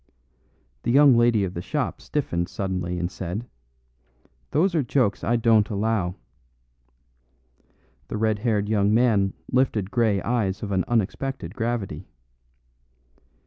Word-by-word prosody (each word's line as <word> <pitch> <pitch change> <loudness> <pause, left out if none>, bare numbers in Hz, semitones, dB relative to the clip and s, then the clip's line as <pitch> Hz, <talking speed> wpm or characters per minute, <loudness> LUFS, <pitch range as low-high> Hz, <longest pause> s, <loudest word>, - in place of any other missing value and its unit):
The - - -3
young 140 +1 +6
lady 120 -3 +3
of 95 -2 -3
the 85 - -4
shop 145 - -3
stiffened 85 -12 -2
suddenly 90 -2 -3
and 90 +1 -2
said, 95 +5 -5 1.0
"Those 175 +5 +2
are 160 - +2
jokes 120 -5 0
I 120 - +1
don't 115 -2 +3
allow." 105 -4 -1 1.9
The - - -4
red 110 -1 +1
haired 105 -3 0
young 105 0 +2
man 110 -5 +3 0.2
lifted 115 -6 +1
grey 110 -5 +2
eyes 110 -6 -1
of 100 - -4
an 95 -3 +1
unexpected 115 -2 -2
gravity. 110 -8 -3
110 Hz, 125 wpm, -24 LUFS, 95-120 Hz, 1.9 s, young